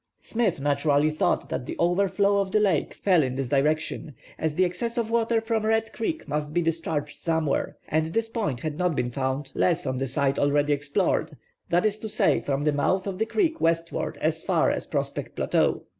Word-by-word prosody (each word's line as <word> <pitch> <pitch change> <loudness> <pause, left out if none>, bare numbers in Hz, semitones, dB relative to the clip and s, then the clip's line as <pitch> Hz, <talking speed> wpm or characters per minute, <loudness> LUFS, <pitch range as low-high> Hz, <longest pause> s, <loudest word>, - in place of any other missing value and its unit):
Smith 225 -9 -1
naturally 145 +1 +2
thought 155 - 0
that 125 - -3
the - - -4
over 175 +3 +2
flow 200 +1 +2
of 195 -1 -1
the 215 - +3
lake 195 -8 +1
fell 185 -5 +3
in 130 -3 -1
this 135 -2 -2
direction, 150 +1 0 0.2
as 160 -1 -1
the 185 - +4
excess 230 +7 -3
of 230 -1 -1
water 230 0 +2
from 225 -1 -1
Red 225 0 +1
Creek 315 +8 -3
must 150 +1 -3
be 175 - +3
discharged 160 -2 -2
somewhere, 160 -4 -1
and 155 +1 +1
this 225 +7 -1
point 205 - -2
had 155 0 -4
not 180 -3 +1
been 125 -1 -1
found 135 +2 -2
less 175 -3 +1
on 130 -1 -2
the 135 - -1
side 135 +1 0
already 145 +1 +2
explored, 145 0 0 0.3
that 175 +4 +2
is 215 0 0
to 220 - -5
say - - +2
from 140 0 -1
the 150 0 +2
mouth 185 +6 +1
of 195 -1 -4
the 220 - +1
creek 325 -6 0
westward 165 0 0
as - - 0
far - - +2
as - - -3
Prospect - - -3
Plateau. - - +1
165 Hz, 205 wpm, -26 LUFS, 145-205 Hz, 0.3 s, the